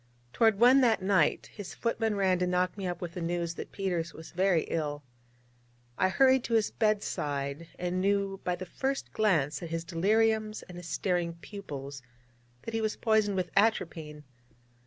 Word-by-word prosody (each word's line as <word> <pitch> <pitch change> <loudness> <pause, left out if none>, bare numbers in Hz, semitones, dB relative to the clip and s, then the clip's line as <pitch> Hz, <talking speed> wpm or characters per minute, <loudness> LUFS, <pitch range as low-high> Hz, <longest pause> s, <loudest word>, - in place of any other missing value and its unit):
Toward 220 -3 +3
one 255 +3 +7
that 225 -6 +3
night, 190 -6 +2
his 205 -3 -8
footman 225 -2 -1
ran 190 -2 +2
to 180 - +1
knock 180 0 +1
me 195 -2 -4
up 175 - -4
with 170 -1 -5
the 180 - -5
news 170 0 -1
that - - -8
Peters 175 -4 -2
was 160 - -10
very 180 -2 +2
ill. 150 -2 -3 0.9
I 185 - +2
hurried 260 +5 +4
to 230 - 0
his 220 -2 +2
bed 215 -2 +1
side, 145 +2 -3
and 180 +1 -1
knew 195 0 0
by 180 - 0
the 185 +1 -7
first 270 +8 -3
glance 155 -10 +1
at 170 - -6
his 165 0 -3
deliriums 215 +5 +1
and 180 - -10
his 175 - -9
staring 175 -1 -1
pupils 145 -8 -8 0.6
that 230 - -6
he 225 - 0
was 215 -1 -1
poisoned 220 -3 +2
with 180 -1 -2
atropine. 165 -8 0
185 Hz, 180 wpm, -29 LUFS, 170-215 Hz, 0.9 s, one